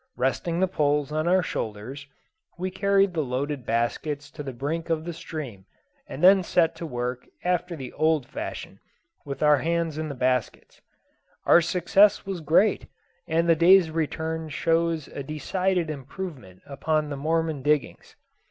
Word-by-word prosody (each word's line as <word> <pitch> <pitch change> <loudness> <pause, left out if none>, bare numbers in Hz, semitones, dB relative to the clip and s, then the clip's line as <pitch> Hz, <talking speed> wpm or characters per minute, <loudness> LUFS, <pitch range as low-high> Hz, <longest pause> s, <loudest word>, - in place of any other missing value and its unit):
Resting 165 +6 0
the 190 - +3
poles 150 -4 0
on 155 +2 -1
our 185 +1 +4
shoulders, 120 +4 -5 0.5
we 185 +1 -3
carried 195 0 +2
the 160 - 0
loaded 135 0 -3
baskets 145 +6 -2
to 155 - -8
the 140 -2 -5
brink 150 +7 -4
of 160 -1 -1
the 170 - -4
stream, 135 - -7 0.4
and 145 - -7
then 190 +1 +8
set 175 -2 +2
to 170 - -5
work 125 -2 -4 0.2
after 180 -1 0
the 130 -5 -8
old 155 -3 +1
fashion, 310 - -7 0.5
with 140 0 -4
our 150 -1 +6
hands 165 -1 -1
in 155 -1 -3
the 140 - -5
baskets. 125 -2 -2 0.6
Our 175 - +7
success 180 +4 +3
was 190 -3 -4
great, 170 +7 +3 0.4
and 165 +1 +1
the 165 - +5
day's 170 +1 +6
return 160 0 -2
shows 165 0 0
a - - -7
decided 170 +4 -1
improvement 135 - -8
upon 150 +2 -1
the - - -2
Mormon 160 0 -1
diggings. 145 -2 -1
155 Hz, 155 wpm, -25 LUFS, 140-170 Hz, 0.6 s, then